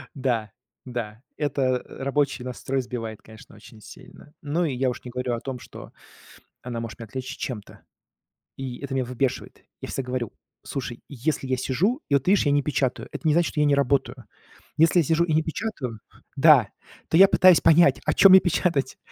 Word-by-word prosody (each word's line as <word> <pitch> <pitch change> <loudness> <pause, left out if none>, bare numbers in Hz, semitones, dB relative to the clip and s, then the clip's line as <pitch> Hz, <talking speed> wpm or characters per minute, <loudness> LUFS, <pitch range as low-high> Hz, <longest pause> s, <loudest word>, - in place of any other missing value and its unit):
Да, 120 -6 -1 0.3
да, 115 -3 -6 0.2
это, 135 -4 0
э, - - -9
рабочий 140 -1 0
настрой 130 +1 -3
сбивает, 115 -3 -6
конечно, 110 0 -16
очень 110 - -16
сильно. 145 +8 -15
Ну 160 +4 -1
и 145 - -2
я 130 +1 0
уж 125 - -7
не 125 - -8
говорю 125 0 -3
о - - -5
том, 130 0 -6
что - - -12 0.7
она 120 -2 -5
может 115 -2 -7
меня 115 - -8
отвлечь 130 +4 -6
чем-то, 110 -6 -7 0.8
и 130 -2 -6
это 140 -1 -6
меня 130 -1 0
выбешивает. 125 +1 -3 0.2
Я - - -6
всегда 135 -2 -4
говорю: 125 -3 -3 0.3
слушай, 125 -3 -6
если 140 +1 -3
я 130 0 0
сижу, 190 - 0
и - - 0
вот 140 - +1
ты 180 - +2
видишь, 200 - +3
я 145 - +3
не 145 0 +2
печатаю, 130 -3 -1
это 160 - -4
не 155 - +4
значит, 170 +1 +2
что - - -4
я 150 - +4
не 145 -1 +3
работаю. 135 -2 0 0.5
Если 165 +3 +4
я - - +4
сижу 160 +3 +2
и 165 -2 -1
не 155 +1 +2
печатаю, 150 - -5 0.4
да, 140 -7 +6 0.4
то 160 - +3
я 195 +2 +9
пытаюсь 185 -3 +5
понять, 165 +2 +5
о - - +2
чём 195 - +7
мне 190 - +10
печатать. 165 -6 0
135 Hz, 200 wpm, -24 LUFS, 125-150 Hz, 0.8 s, мне